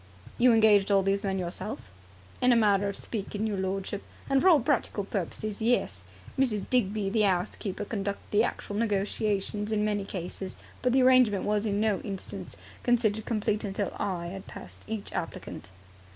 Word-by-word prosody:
"You 250 +1 +6
engaged 215 -3 +5
all 195 -1 +4
these 195 +1 +1
men 195 -1 -1
yourself?" 175 - -5 0.5
"In 250 - +5
a - - +6
manner 205 -3 +3
of 200 - -4
speaking, 210 -1 -3
your 205 -3 -1
lordship, 195 +1 -2 0.3
and 275 -1 +3
for 375 - +6
all 325 -5 +7
practical 245 -6 0
purposes, 200 +2 -4
yes. 100 - +1 0.3
Mrs. 220 -7 +1
Digby, 210 -5 +1
the 215 0 +3
'ouse 185 -3 +1
keeper 205 +1 -4
conducted 200 -2 -4
the 210 +2 +4
actual 205 - -3
negotiations 210 -1 0
in 210 -1 +1
many 205 -1 0
cases, 190 0 -6 0.3
but 250 - +2
the 260 +1 +4
arrangement 255 -6 +5
was 210 +1 0
in 205 0 0
no 215 -3 +2
instance 195 -2 -7 0.2
considered 220 -3 +1
complete 215 -2 0
until 200 -1 -2
I 185 -4 -2
had 190 +1 -8
passed - - -11
each 220 -2 -5
applicant." - - -5
205 Hz, 170 wpm, -28 LUFS, 195-220 Hz, 0.5 s, all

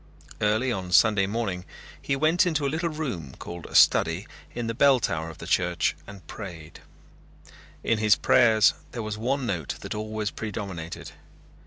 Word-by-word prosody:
Early 110 +5 +2
on 95 -5 -4
Sunday 105 0 +5
morning 100 -4 -2 0.4
he 140 - -1
went 155 +6 +3
into 150 -4 0
a - - +1
little 170 +1 -1
room 125 - -5
called 85 -1 -8
a - - -10
study - - +4 0.3
in 120 -1 -3
the 115 - -2
bell 135 +1 +5
tower 80 -6 -2
of 80 - -11
the - - -9
church 90 -1 +1
and 100 -2 -12
prayed. 85 -6 -9 1.0
In 115 - +1
his 105 -1 +5
prayers 110 -4 +4 0.2
there 115 - -4
was 105 0 -5
one 130 +3 -1
note 85 - -3
that - - -5
always 110 0 -3
predominated. 95 -6 -6
110 Hz, 165 wpm, -26 LUFS, 90-125 Hz, 1.0 s, Sunday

